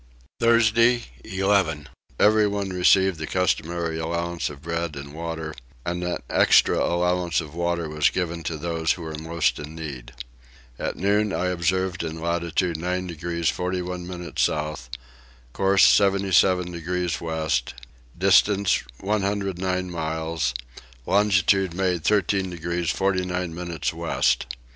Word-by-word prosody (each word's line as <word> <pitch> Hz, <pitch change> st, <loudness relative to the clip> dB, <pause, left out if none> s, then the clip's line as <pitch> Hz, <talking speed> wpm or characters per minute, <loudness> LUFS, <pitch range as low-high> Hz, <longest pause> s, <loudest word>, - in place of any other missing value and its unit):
Thursday 115 Hz, +1 st, +4 dB, 0.2 s
11. 95 Hz, -6 st, 0 dB, 0.3 s
Everyone 105 Hz, -2 st, +3 dB
received 95 Hz, -1 st, +3 dB
the 80 Hz, -, -4 dB
customary 85 Hz, -2 st, -1 dB
allowance 85 Hz, +1 st, -2 dB
of 70 Hz, -1 st, -11 dB
bread 85 Hz, -1 st, -3 dB
and 70 Hz, 0 st, -8 dB
water, 80 Hz, -1 st, -5 dB, 0.3 s
and 85 Hz, +1 st, -2 dB
an 90 Hz, 0 st, -1 dB
extra -, -, +4 dB
allowance 90 Hz, -1 st, +1 dB
of 75 Hz, -2 st, -7 dB
water 85 Hz, -1 st, -1 dB
was 75 Hz, -1 st, +2 dB
given 85 Hz, -2 st, -3 dB
to 80 Hz, -1 st, -4 dB
those 80 Hz, 0 st, 0 dB
who 85 Hz, -, -8 dB
were 80 Hz, -1 st, -6 dB
most 80 Hz, +1 st, -1 dB
in 75 Hz, +2 st, -8 dB
need. 70 Hz, -7 st, -7 dB, 0.7 s
At -, -, -2 dB
noon 105 Hz, +2 st, +1 dB
I 90 Hz, -1 st, 0 dB
observed 95 Hz, +1 st, 0 dB
in 80 Hz, 0 st, -5 dB
latitude 85 Hz, +1 st, -1 dB
9 90 Hz, +2 st, -2 dB
degrees 85 Hz, -1 st, -2 dB
41 90 Hz, +1 st, -3 dB
minutes 90 Hz, -1 st, -4 dB
south; 75 Hz, -5 st, -1 dB, 0.6 s
course 95 Hz, 0 st, +3 dB
77 95 Hz, -2 st, +4 dB
degrees 90 Hz, +1 st, -2 dB
west, 80 Hz, -6 st, -1 dB, 0.4 s
distance 100 Hz, +1 st, +4 dB, 0.2 s
109 95 Hz, -3 st, -1 dB
miles; 80 Hz, -5 st, -2 dB, 0.5 s
longitude 95 Hz, -2 st, +3 dB
made 90 Hz, -3 st, 0 dB
13 100 Hz, -1 st, +1 dB
degrees 85 Hz, 0 st, -3 dB
49 90 Hz, -2 st, -1 dB
minutes 85 Hz, -2 st, -3 dB
west. -, -, 0 dB
85 Hz, 125 wpm, -24 LUFS, 80-95 Hz, 0.7 s, Thursday